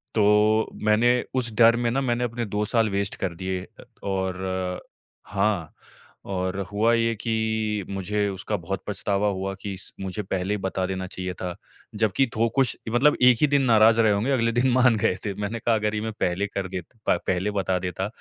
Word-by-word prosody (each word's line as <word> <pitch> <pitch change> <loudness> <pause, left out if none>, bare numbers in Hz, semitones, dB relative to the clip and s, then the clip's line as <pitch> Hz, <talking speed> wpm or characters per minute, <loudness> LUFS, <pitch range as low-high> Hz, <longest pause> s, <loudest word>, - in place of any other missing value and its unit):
तो 105 +1 +3
मैंने 120 +3 +3
उस 120 -3 0
डर 115 0 +7
में 120 -1 0
ना 135 +3 0
मैंने 120 -1 0
अपने 120 0 -3
2 105 +1 -2
साल 115 -1 +1
वेस्ट 100 0 -2
कर 90 -3 -2
दिए। 95 +1 -3
अ, - - -16 0.2
और 95 -1 -2 0.5
हाँ, 100 -5 -1 0.5
और 95 0 -2
हुआ 110 +3 +3
ये 115 0 +2
कि 110 -2 -1
मुझे 100 +1 -1
उसका 100 +2 -3
बहुत 95 +3 -4
पछतावा 100 0 0
हुआ 95 0 -3
कि 100 -1 -4
इस 95 - -8
मुझे 95 +2 -3
पहले 95 +2 -2
ही - - 0
बता 95 -1 -1
देना 95 -1 -4
चाहिए 90 0 -5
था। 90 -1 -5 0.4
जबकि 110 +5 +2
थो 115 +1 +2
कुछ 135 -3 +3 0.2
मतलब 135 +6 +4
1 125 -2 +7
ही 150 - +5
दिन 145 0 +3
नाराज़ 115 -2 +5
रहे 110 - +4
होंगे, 110 +7 0
अगले 115 -3 +2
दिन 120 +3 +2
मान 125 -2 +5
गए 100 -3 +1
थे। 100 - -1
मैंने 110 +3 -3
कहा, 115 0 +2
अगर 105 0 -1
ये 105 - -1
मैं 110 - -3
पहले 90 +3 0
कर 100 -1 -4
दे 95 -1 -4 0.3
प - - +4
पहले 95 +3 0
बता 95 -2 0
देता, 95 +2 -3
105 Hz, 200 wpm, -25 LUFS, 95-115 Hz, 0.5 s, डर